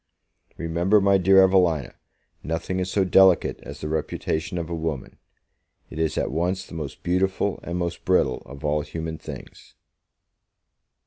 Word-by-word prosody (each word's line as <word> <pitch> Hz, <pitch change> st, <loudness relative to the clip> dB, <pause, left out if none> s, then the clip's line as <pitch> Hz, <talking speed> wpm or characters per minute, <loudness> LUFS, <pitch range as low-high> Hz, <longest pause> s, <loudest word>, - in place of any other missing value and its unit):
Remember, 85 Hz, +5 st, +2 dB
my 100 Hz, 0 st, +4 dB
dear 95 Hz, +1 st, +6 dB
Evelina, 90 Hz, -7 st, +2 dB, 0.5 s
nothing 80 Hz, +3 st, -3 dB
is 90 Hz, 0 st, -2 dB
so 95 Hz, 0 st, +1 dB
delicate 95 Hz, -1 st, +4 dB
as 70 Hz, +1 st, -10 dB
the 75 Hz, -, -3 dB
reputation 80 Hz, +2 st, -2 dB
of 85 Hz, -2 st, -3 dB
a 85 Hz, -, -5 dB
woman; 80 Hz, -5 st, -4 dB, 0.7 s
it 80 Hz, -, -7 dB
is 80 Hz, -1 st, 0 dB
at -, -, -1 dB
once 90 Hz, +5 st, -1 dB
the -, -, -13 dB
most 75 Hz, -5 st, -6 dB
beautiful 95 Hz, +2 st, 0 dB
and 85 Hz, +1 st, -4 dB
most 85 Hz, -1 st, -3 dB
brittle 80 Hz, -9 st, +2 dB
of 70 Hz, +2 st, -9 dB
all 75 Hz, 0 st, +1 dB
human 80 Hz, +2 st, -6 dB
things. -, -, -11 dB
85 Hz, 150 wpm, -24 LUFS, 80-95 Hz, 0.7 s, dear